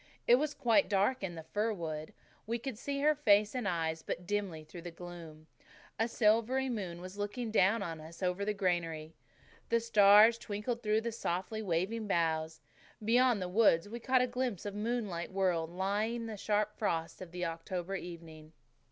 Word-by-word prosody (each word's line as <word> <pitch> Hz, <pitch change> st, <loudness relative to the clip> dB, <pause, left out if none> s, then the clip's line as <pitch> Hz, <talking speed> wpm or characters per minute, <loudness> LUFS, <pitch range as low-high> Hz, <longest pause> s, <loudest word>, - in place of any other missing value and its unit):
It 240 Hz, -, +7 dB
was 295 Hz, +2 st, -1 dB
quite 275 Hz, +1 st, +3 dB
dark 205 Hz, +6 st, +2 dB
in 180 Hz, -3 st, -4 dB
the 160 Hz, -, -7 dB
fir 215 Hz, +2 st, +1 dB
wood. 155 Hz, -4 st, -5 dB, 0.4 s
We 230 Hz, +1 st, 0 dB
could 250 Hz, +1 st, -5 dB
see 280 Hz, +1 st, -3 dB
her 305 Hz, +1 st, +5 dB
face 210 Hz, -8 st, +3 dB
and 250 Hz, -5 st, -2 dB
eyes 160 Hz, -3 st, -1 dB
but 175 Hz, -, -5 dB
dimly 190 Hz, -5 st, -2 dB
through 170 Hz, +3 st, -10 dB
the 175 Hz, -, -6 dB
gloom. 165 Hz, -2 st, -10 dB, 0.5 s
A 225 Hz, -, +2 dB
silvery 230 Hz, +4 st, +2 dB
moon 185 Hz, -7 st, -4 dB
was 185 Hz, +3 st, -9 dB
looking 220 Hz, +3 st, -3 dB
down 205 Hz, +1 st, +3 dB
on 165 Hz, -4 st, -5 dB
us 165 Hz, +4 st, -10 dB
over 180 Hz, +2 st, 0 dB
the 210 Hz, +1 st, -1 dB
granary. 165 Hz, -5 st, -1 dB, 0.6 s
The 230 Hz, -, +3 dB
stars 220 Hz, 0 st, +6 dB
twinkled 220 Hz, +3 st, -3 dB
through 215 Hz, -1 st, +1 dB
the 235 Hz, +1 st, -3 dB
softly 215 Hz, 0 st, -3 dB
waving 205 Hz, +4 st, -1 dB
boughs. 160 Hz, -3 st, 0 dB, 0.4 s
Beyond 240 Hz, -2 st, +4 dB
the -, -, -3 dB
wood 180 Hz, -3 st, +4 dB
we 235 Hz, -, -5 dB
caught 255 Hz, +1 st, +3 dB
a -, -, +3 dB
glimpse 245 Hz, -6 st, -3 dB
of 205 Hz, -, -4 dB
a -, -, -7 dB
moonlit 210 Hz, -6 st, -2 dB
world 180 Hz, -4 st, 0 dB
lying 200 Hz, +6 st, -1 dB
in -, -, -5 dB
the 225 Hz, -1 st, -5 dB
sharp 210 Hz, +1 st, 0 dB
frost 165 Hz, -6 st, -2 dB
of 185 Hz, -, -7 dB
the 180 Hz, 0 st, -3 dB
October 170 Hz, +3 st, -4 dB
evening. 165 Hz, -3 st, -9 dB
200 Hz, 185 wpm, -32 LUFS, 170-230 Hz, 0.6 s, It